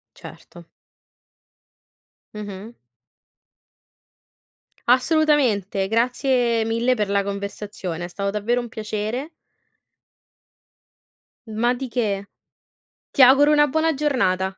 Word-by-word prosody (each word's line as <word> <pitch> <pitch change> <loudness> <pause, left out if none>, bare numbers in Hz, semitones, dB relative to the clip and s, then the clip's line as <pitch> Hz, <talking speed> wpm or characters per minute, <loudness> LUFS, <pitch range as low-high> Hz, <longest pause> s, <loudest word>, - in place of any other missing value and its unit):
Certo. - - -13 1.7
Mh-mh. 210 +1 -8 2.1
Assolutamente, 250 - +2
grazie 240 0 +1
mille 235 +3 +1
per 210 -3 -1
la 200 0 +2
conversazione, 200 -3 -5
è - - -6
stato 200 +3 -3
davvero 230 +4 0
un 240 - -7
piacere. 220 +6 -4 2.2
Ma 230 +3 0
di 260 +1 -5
che. 205 -5 -2 0.8
Ti 275 - +2
auguro 275 +4 +7
una 295 0 +5
buona 315 +3 +1
giornata. 255 -11 0
230 Hz, 85 wpm, -22 LUFS, 200-260 Hz, 2.2 s, auguro